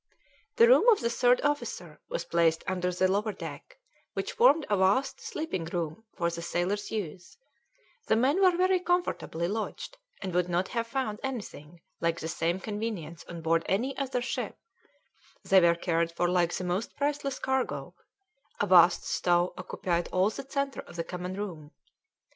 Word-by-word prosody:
The 465 - +7
room - - +6
of 435 - +5
the 235 0 0
third 245 +1 +3
officer 290 0 -2
was - - -3
placed 165 -1 +2
under 180 -1 -1
the 185 +1 +2
lower 205 +3 0
deck, - - -9 0.4
which - - -3
formed 330 -10 +4
a 205 - +2
vast 200 +9 +2
sleeping 245 - -4
room 170 +4 -4
for 170 -1 0
the 170 0 -5
sailors' 175 +4 -1
use; 185 -4 -5 0.7
the - - +4
men 270 - +2
were 365 -2 +5
very 370 0 +3
comfortably 350 - -1
lodged, 225 - -4 0.2
and 185 - -5
would 180 0 +1
not 175 +2 0
have 230 -2 -2
found 230 -4 -2
anything 175 - -6 0.2
like 170 0 0
the 160 - -4
same 165 +2 -1
convenience 205 -7 -5
on 170 -1 -7
board 165 0 +3
any 245 +8 0
other 255 -3 -2
ship; - - -3 0.9
they 190 -1 +5
were 170 -1 +5
cared 170 -1 0
for 175 +1 0
like 175 -1 +2
the - - -3
most 180 +5 -2
priceless 285 -1 -1
cargo: 265 0 -2 0.7
a - - +2
vast 180 -2 +6
stove 175 0 +1
occupied 175 -1 -2
all 185 +3 +2
the 265 - -8
centre 275 -1 -2
of - - -14
the 165 - -2
common 180 +2 -5
room. 175 -7 -6
190 Hz, 170 wpm, -29 LUFS, 170-260 Hz, 0.9 s, The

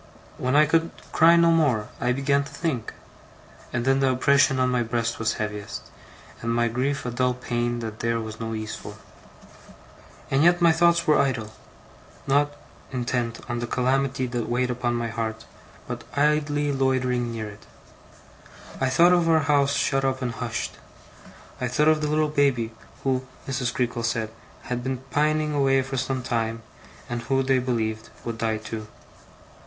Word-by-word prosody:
When 130 +2 0
I 150 +1 +7
could 165 +2 +2 0.2
cry 165 +1 +6
no 170 0 +5
more, 130 -10 +2
I 125 - +1
began 140 +2 +2
to 140 - -11
think; 140 -5 -2 0.8
and 120 -1 -2
then 135 0 +3
the 135 -1 +3
oppression 135 +1 +3
on 130 0 +3
my 125 -1 +2
breast 115 0 -1
was 115 0 +1
heaviest, 105 -1 -5 0.5
and 115 - -1
my 120 0 +2
grief 130 +4 -1
a 125 - -2
dull 125 +1 +1
pain 120 -1 -2
that 110 -1 -6
there 115 0 0
was 110 -1 -6
no 115 0 -3
ease 110 0 -4
for. 105 - -9 1.4
And 135 +2 +3
yet 175 +1 +5
my 170 -2 +6
thoughts 170 +1 +3
were 150 - +4
idle; 115 -6 0 0.7
not 145 +2 +2 0.4
intent 120 -2 -2
on 120 -1 -2
the 120 - -3
calamity 130 +1 +1
that 120 -2 -3
weighed 125 +1 +1
upon 120 -1 -1
my 120 0 -1
heart, 110 0 -4 0.4
but - - -5
idly 145 0 +2
loitering 130 -3 +1
near 110 -2 -4
it. 105 +1 -12 1.1
I 130 - +1
thought 170 +7 +5
of 175 -2 +3
our 160 -1 +5
house 140 -1 +2
shut 135 -1 +1
up 135 -1 0
and 125 - -1
hushed. 115 -1 -4 0.9
I - - +1
thought 150 +5 +2
of 155 -1 +3
the 150 - 0
little 155 +1 +2
baby, 135 -6 +1 0.3
who, 130 -1 0 0.2
Mrs. 125 -2 -1
Creakle 120 -2 -1
said, 115 -1 -1 0.3
had 125 0 -3
been 130 0 -3
pining 150 +2 +1
away 135 -2 +3
for 135 +1 -5
some 130 0 -1
time, 115 -1 -2 0.4
and 120 -1 -3
who, 135 +2 +1
they 130 0 +3
believed, 110 -3 -2 0.2
would 115 -1 -4
die 110 -1 0
too. 110 0 -6
125 Hz, 170 wpm, -25 LUFS, 115-140 Hz, 1.4 s, I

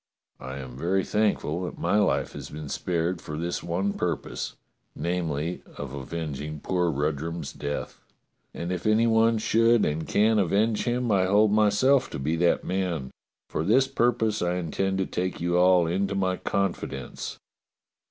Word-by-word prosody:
I 65 +2 -6
am 65 -2 -8
very 90 +7 0
thankful 100 -6 0
that - - -6
my 105 - +2
life 100 - +1
has - - -7
been 75 -1 -7
spared 85 +1 -1
for 75 - -6
this 85 +2 -2
one 95 +4 -1
purpose - - -3 0.2
— - - -48
namely, 85 -1 -2 0.2
of 70 -2 -6
avenging 75 +1 -5
poor 90 +2 0
Rudrum's 80 +3 -2
death 70 0 -5 0.3
— - - -47
and 85 +1 -4
if 90 +2 -2
any 110 +2 +4
one 115 0 +4
should 115 +1 +3
and 75 +1 -2
can 110 +1 +3
avenge 105 +4 +2
him, 120 -1 0
I 95 -2 +3
hold 105 +2 +4
myself 110 +6 +4
to - - -5
be 75 +4 -1
that 85 +1 +2
man. 90 -8 -2 0.4
For - - -2
this 130 +9 +4
purpose 120 -4 +1
I 90 0 +1
intend 95 +3 -1
to 95 - +1
take 90 0 -3
you 85 +1 +1
all 90 -1 +5
into 95 +4 0
my 95 -1 0
confidence. 100 -2 -3
90 Hz, 165 wpm, -26 LUFS, 80-105 Hz, 0.4 s, all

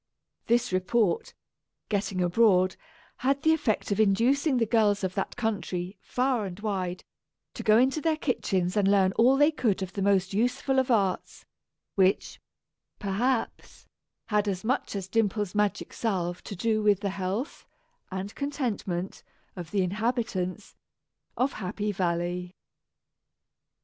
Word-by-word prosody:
This 240 -2 +2
report, 185 0 +1 0.5
getting 195 -3 -1
abroad, 185 0 +3 0.4
had 275 +2 0
the 320 - +5
effect 235 -10 -1
of 200 - 0
inducing 250 +8 +3
the 230 - +2
girls 210 -3 +2
of 185 -1 -1
that 195 - -3
country, 195 -5 -3
far 250 -4 0
and 185 +1 -8
wide, 185 -4 -3 0.5
to - - -6
go 215 -1 +5
into 265 +5 +2
their 315 0 +1
kitchens 190 - -1
and 205 -2 +3
learn 195 -2 +4
all 250 +6 +4
they 295 +2 +5
could 215 -10 0
of 190 - -7
the 200 - -3
most 195 -1 +2
useful 260 +5 +1
of 260 - 0
arts; 200 -6 0 0.5
which, 190 0 +1 0.6
perhaps, 225 +5 -2 0.4
had 210 -1 +1
as 190 -1 -2
much 245 -1 -1
as 195 -2 -4
Dimple's 210 -2 0
magic 210 -1 -1
salve 180 -6 -2
to 200 - -6
do 215 +3 0
with 205 -2 +3
the 200 -2 -1
health 195 - -4 0.4
and 190 +2 -5
contentment 225 -11 -3 0.3
of 175 -4 -7
the 195 0 +1
inhabitants 210 -2 -2 0.6
of 260 +3 +1
Happy 205 +1 -3
Valley! 180 0 -2
205 Hz, 140 wpm, -27 LUFS, 185-240 Hz, 0.6 s, the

